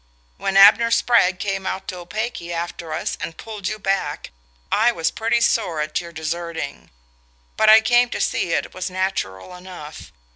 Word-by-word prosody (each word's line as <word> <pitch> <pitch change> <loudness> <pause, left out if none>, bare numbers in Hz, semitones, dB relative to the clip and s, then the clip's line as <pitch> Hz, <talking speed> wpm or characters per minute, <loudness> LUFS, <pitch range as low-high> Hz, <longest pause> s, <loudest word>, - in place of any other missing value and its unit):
When 195 0 -1
Abner 210 +4 +7
Spragg 230 -6 +3
came 195 0 -3
out 190 0 -4
to 185 - -5
Opake 215 -1 -4
after 170 -1 -5
us - - -3
and 165 - -6
pulled 210 -4 -6
you 215 - -3
back 195 -7 -2 0.4
I 230 +3 +4
was 165 -7 -1
pretty 230 +2 0
sore 165 -7 +1
at 150 +2 -2
your 170 -1 -10
deserting; 160 -1 -5 0.7
but 220 - +4
I 220 +1 +9
came 240 +2 +3
to - - -4
see - - 0
it - - -1
was 185 0 -4
natural 180 - -3
enough. 180 - -10
185 Hz, 170 wpm, -21 LUFS, 170-215 Hz, 0.7 s, I